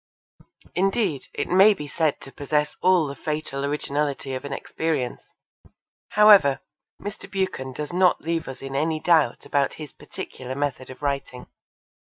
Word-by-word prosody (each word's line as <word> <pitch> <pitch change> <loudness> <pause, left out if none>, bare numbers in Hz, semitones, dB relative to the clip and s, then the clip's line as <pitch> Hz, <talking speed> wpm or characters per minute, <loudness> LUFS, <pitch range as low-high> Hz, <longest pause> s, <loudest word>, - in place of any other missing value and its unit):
Indeed, 195 - 0
it - - -3
may 195 +4 +6
be 150 -5 -7
said 155 0 0
to 135 - -11
possess 150 +1 -1
all 185 -3 +4
the 140 - -4
fatal 150 -2 -4
originality 140 -1 -2
of 130 - -4
inexperience. 140 -1 -3 1.0
However, 200 -11 +7 0.4
Mr. 205 -1 -7
Buchan 190 -9 -2
does 150 +5 -5
not 180 0 +4
leave 165 0 -2
us 135 0 -8
in 135 0 -5
any 155 +2 0
doubt 155 -7 +2
about 140 -1 0
his 150 -3 -9
particular 130 0 -8
method 140 -2 -3
of 130 +2 -11
writing. 140 -3 -3
150 Hz, 145 wpm, -24 LUFS, 135-175 Hz, 1.0 s, However